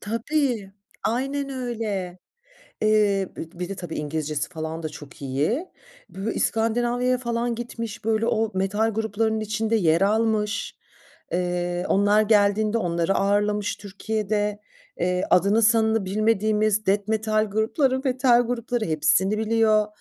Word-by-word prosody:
Tabii, 230 -2 -1 0.3
aynen 275 +4 -1
öyle. 220 -8 -4 0.6
Eee, 205 -3 +3
be - - -4 0.2
bir 180 - -3
de, 195 - -4
tabii, 175 -3 -6
İngilizcesi 150 -1 -3
falan 160 -1 -5
da 155 - -2
çok 145 -1 -12
iyi. 150 - -1 0.4
Böyle 200 +3 -4
İskandinavya'ya 240 +3 +1
falan 235 -1 -1
gitmiş, 230 -2 -6
böyle 225 0 +1
o 220 -1 +1
metal 205 +4 +1
gruplarının 220 0 -1
içinde 215 +1 0
yer 165 -4 +3
almış. 215 +1 +1 0.6
Eee, 175 0 -1
onlar 205 +2 +4
geldiğinde 210 +1 +3
onları 170 -1 0
ağırlamış 205 +1 +1
Türkiye'de. 210 +1 -2 0.4
Eee, 180 +1 +1
adını 200 +5 +4
sanını 220 -1 +3
bilmediğimiz 215 +1 +1
death 200 +1 +1
metal 215 0 +1
grupları 255 +6 +1
metal 250 -2 +4
grupları, 240 -1 -2
hepsini 190 +6 +2
biliyor, 220 -1 +3
215 Hz, 125 wpm, -24 LUFS, 195-225 Hz, 0.6 s, onlar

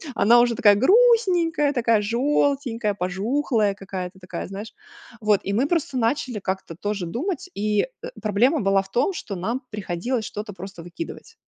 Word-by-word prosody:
Она 225 +4 +6
уже 240 -1 +3
такая 205 -1 +6
грустненькая, 355 - +4
такая 230 -4 +2
желтенькая, 240 -1 0
пожухлая 205 +3 0
какая-то 190 -1 -6
такая, 180 -2 -6
знаешь, 200 +3 -8 0.5
вот, 210 -2 +3
и 200 - -2
мы 245 +7 +2
просто 325 -4 -1
начали 245 -1 0
как-то 190 -3 -4
тоже 205 +1 -3
думать 310 - -3
и, 210 +1 +1
э, - - -4 0.3
проблема 240 - +2
была 195 0 +3
в 195 - -14
том, 250 - +1
что 210 - -6
нам 225 +9 -2
приходилось 210 +4 -3
что-то 210 +1 -6
просто 190 -1 -9
выкидывать. 330 - -8
215 Hz, 155 wpm, -23 LUFS, 195-275 Hz, 0.5 s, Она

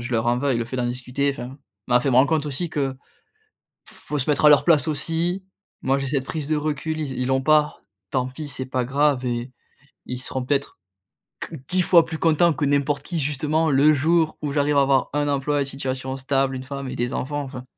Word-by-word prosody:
je 125 +2 -6
leur 115 0 +1
en 120 +1 +2
veuille. 135 -2 +1
Le 115 - -1
fait 130 - -5
d'en 120 -1 0
discuter, 125 +3 -1
enfin, 135 +1 -7 0.3
m'a 125 0 +4
fait 135 +2 0
me 125 - +3
rendre 130 +2 +6
compte, 155 -2 +1
aussi, 155 +4 -3
que, 135 -3 -2 0.9
faut 150 - -5
se 135 - -2
mettre 145 +1 +1
à - - +10
leur 145 - +6
place 155 -4 +4
aussi. 170 +5 -1 0.4
Moi, 135 +1 +1
j'ai 135 -1 -3
cette 135 -2 -1
prise 155 -2 -4
de 155 - +1
recul, 155 +1 -2
ils 145 -4 -3
ils 125 - -1
l'ont 130 0 +1
pas, 155 0 +2 0.3
tant 130 -1 0
pis, 145 +3 -7
c'est 130 -1 -4
pas 130 -1 -1
grave 140 0 +1
et 120 +1 -3 0.5
ils 125 0 -5
seront 130 0 -4
peut-être 140 -3 -1 0.6
qu 160 - -6
10 185 0 +2
fois 170 -2 +5
plus 160 -1 -5
content 165 +1 +3
que 145 - -2
n'importe 140 0 +1
qui, 170 +1 -4
justement, 150 +2 0
le 145 +3 +5
jour 160 +3 +1
où 145 -2 -2
j'arrive 145 0 +1
à - - +6
avoir 135 -1 +2
un 145 0 +1
emploi 145 +1 0
et - - +1
une - - -4
situation 130 -1 -4
stable, 135 0 0
une 130 - -6
femme 140 -1 -6
et - - -5
des 120 +1 -2
enfants. 145 +2 -2
Enfin, 130 -2 -8
140 Hz, 235 wpm, -23 LUFS, 130-150 Hz, 0.9 s, à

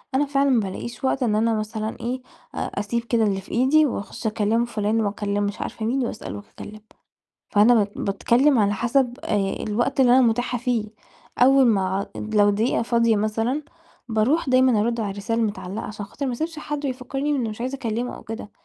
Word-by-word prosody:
أنا 290 +2 +3
فعلًا 280 0 +1
ما 245 -3 +4
بالاقيش 215 +6 -5
وقت 260 0 +1
إن 215 -3 +1
أنا 225 +1 +2
مثلًا 215 0 -3
إيه، 250 +2 -3 0.3
أ - - -8 0.2
أسيب 230 +3 -2
كده 235 -1 +1
اللي 195 -2 0
في - - -14
إيدي، 275 +6 +4
وأخُش 220 -2 -4
أكلم 220 +2 +1
فُلان، 220 -1 0
وأكلم 205 0 -1
مش 200 0 -3
عارفة 220 - -4
مين، 255 +2 0
وأسأل - - -6
وأتكلم. 210 +1 -10 0.7
فأنا 215 +3 +6
بات 205 -2 +2
باتكلم 240 +7 +2
على 205 -1 +3
حسب 245 +3 +1
آآ 210 - 0 0.3
الوقت 240 +6 0
اللي 245 -2 +5
أنا 260 - +6
متاحة 245 +1 +1
فيه، 240 -3 0 0.5
أول 265 +1 +6
ما 195 -2 +1
لو 210 -1 +2
دقيقة 220 +4 +1
فاضية 230 -2 +2
مثلًا، 225 +7 -1 0.5
باروح 235 +8 +1
دايمًا 255 -4 +4
أرُد 230 +1 0
على 205 -2 -2
الرسالة 205 +4 -2
المتعلقة، 205 -1 -3
عشان 210 -1 -7
خاطر 275 +7 -5
ما 255 - -1
أسيبش 320 +5 -4
حد 295 -1 -5
ويفكّرني 270 +3 -3
إنّي 255 -6 0
مش 215 +2 -7
عايزة 260 +2 -2
اكلمه 240 -1 -3
أو - - -12
كده، 220 -1 -7
230 Hz, 190 wpm, -23 LUFS, 210-255 Hz, 0.7 s, فأنا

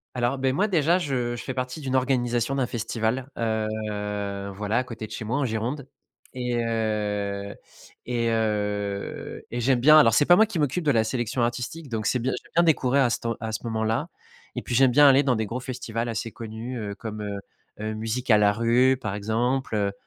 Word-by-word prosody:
Alors, 125 +2 0
beh, 130 0 +1
moi, 200 +10 +2
déjà, 170 -3 +3
je 125 -8 -1
je 120 - -7
fais 130 - -4
partie 130 +4 -4
d'une 130 -2 -2
organisation 125 -1 +1
d'un 135 -2 +1
festival, 115 +2 -2
heu, 105 -3 -2
voilà, 105 +2 -1
à - - 0
côté 115 -3 -7
de - - -14
chez - - -5
moi, 115 +6 -1
en 145 - +1
Gironde 120 +5 -3 0.5
et 125 -1 -2
heu 105 -3 -2 0.5
et 120 -1 0
heu 105 -2 -2
et 120 - -3
j'aime 125 +1 +3
bien 155 +5 +7
alors 130 -7 +6
c'est 145 - +4
pas 175 - +8
moi 220 - +6
qui 205 -6 -4
m'occupe 150 +4 0
de 150 - +3
la 115 -4 +3
sélection 120 +1 -2
artistique, 125 +6 -3
donc 110 -3 -3
c'est 125 - +1
bien 130 +3 -1
j'aime - - -11
bien 170 - +5
découvrir 140 -4 +3
à 125 - +3
cette - - -2 0.2
à 110 -1 -4
ce 110 - -4
moment-là 110 +6 -1 0.5
et - - -2
puis 120 - -3
j'aime 130 +1 +5
bien 145 +3 +7
aller 135 +1 +5
dans 130 -3 +2
des 110 0 -1
gros 120 +4 -4
festivals 120 -2 -4
assez 115 0 -3
connus, 115 +3 -6
heu, 105 -2 -4
comme, 110 -1 -6
heu 100 -1 -4 0.4
heu, 110 0 -3
Musicalarue, 115 +2 +3
par 110 -5 -3
exemple, 115 +4 -1
heu 100 -1 +1
120 Hz, 205 wpm, -25 LUFS, 110-130 Hz, 0.5 s, pas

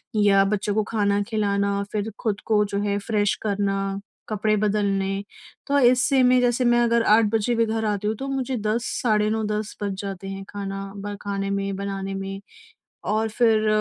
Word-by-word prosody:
या 200 -2 +5
बच्चों 205 0 -1
को 215 - +2
खाना 205 -2 +1
खिलाना, 200 -2 0
फिर 215 +1 -2
खुद 210 -3 -1
को 210 -2 +3
जो 200 0 -3
है 200 0 0
फ्रेश 205 -1 0
करना, 195 -1 -1 0.3
कपड़े 215 0 +1
बदलने 200 -1 0 0.4
तो 285 0 +3
इससे 255 +1 +4
मैं 250 0 +5
जैसे 245 +1 +2
मैं 240 0 +4
अगर 235 0 +3
8 225 -1 +4
बजे 225 +2 +1
भी 230 0 +3
घर 220 0 -2
आती 210 0 -1
हूँ 220 - 0
तो 270 - -4
मुझे 265 -1 -2
10 220 +3 -1 0.2
साढ़े 215 -3 +2
9-10 215 -1 -2
बज 200 -1 -1
जाते 195 -1 -6
हैं 195 0 -6
खाना 195 -1 -5
ब 205 +1 -5
खाने 200 -1 -3
में, 200 0 -2
बनाने 195 0 -4
में। 195 0 -5 0.7
और 220 +1 +1
फिर 220 -1 +2
210 Hz, 180 wpm, -24 LUFS, 200-225 Hz, 0.7 s, या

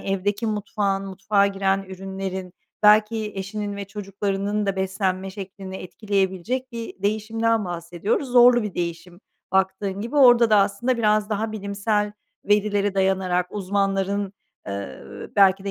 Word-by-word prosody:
evdeki 200 +3 -1
mutfağın, 205 -2 -1
mutfağa 200 +1 +2
giren 195 0 0
ürünlerin, 190 -1 -6 0.3
belki 210 +1 +4
eşinin 200 +1 -4
ve 200 - -4
çocuklarının 200 +1 -2
da 195 - 0
beslenme 190 0 -1
şeklini 190 -1 -8
etkileyebilecek 200 +6 -2
bir 230 -4 -7
değişimden 220 +2 0
bahsediyoruz. 175 - -2
Zorlu 245 -1 +6
bir 210 -3 -5
değişim 175 +1 -5 0.3
baktığın 190 +1 0
gibi. 235 +7 -4
Orada 245 -4 +7
da 215 - +6
aslında 200 +6 +2
biraz 215 -1 +2
daha 215 +1 -1
bilimsel 205 0 -1 0.3
verilere 205 -1 +2
dayanarak 190 -2 +1
uzmanların, 195 0 -1 0.4
ııı, 100 -9 -7
belki 195 -1 +5
de 200 - -2
200 Hz, 125 wpm, -23 LUFS, 190-210 Hz, 0.4 s, Orada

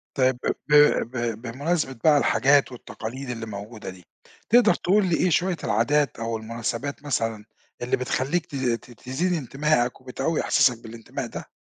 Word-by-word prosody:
طيب 130 -2 +3
ب - - -1 0.2
ب 150 - +5 0.4
ب 115 -2 -2
بمناسبة 140 +4 -2
بقى 150 -2 +6
الحاجات 140 +2 +3
والتقاليد 125 +3 -7
اللي 115 -2 -4
موجودة 105 0 -8
دي، 90 -2 -12 0.4
تقدر 235 -2 +6
تقول 195 +2 +2
لي 175 -3 +2
إيه 185 - +2
شويّة 175 +1 +1
العادات 140 +6 +1
أو 115 0 -2
المناسبات 115 +6 -4
مثلًا، 115 -6 -2 0.4
اللي 120 - 0
بتخليك 135 +6 -1
ت 140 - -10
ت 125 -2 -2
تزيد 130 +10 -2
انتماءك 140 -3 0
وبتقوي 135 +5 -2
إحساسك 130 -5 +3
بالانتماء 115 0 -6
ده؟ - - -8
130 Hz, 155 wpm, -24 LUFS, 115-150 Hz, 0.4 s, بقى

